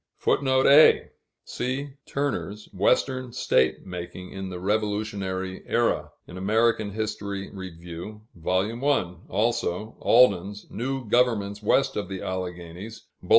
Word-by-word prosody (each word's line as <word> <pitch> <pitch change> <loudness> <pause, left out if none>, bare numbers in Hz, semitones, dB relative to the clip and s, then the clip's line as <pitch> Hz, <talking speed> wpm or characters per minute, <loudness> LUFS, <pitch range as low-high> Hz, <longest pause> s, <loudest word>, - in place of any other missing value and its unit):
[Footnote 130 -1 +2
A: 145 +3 +7 0.3
See 130 +3 -3 0.2
Turner's 135 -7 -3
"Western 130 +6 +1
State 65 - +2
Making 90 0 -7
in 95 -1 -5
the 90 -1 -6
Revolutionary 100 -2 -2
Era," - - +1 0.2
in 90 - -10
Amer. 110 +5 +3
Hist. 110 0 -4
Rev., 100 -1 -5 0.8
Vol. 95 +8 -1
I.; 115 -12 +1
also, 105 -1 -1
Alden's 105 -4 +4
"New 130 +2 -3
Governments 105 -4 +2
West 135 +6 +2
of 105 - -3
the 95 -1 -5
Alleghanies," 90 +3 -6 0.2
_Bull. - - -12
105 Hz, 115 wpm, -26 LUFS, 95-120 Hz, 0.8 s, A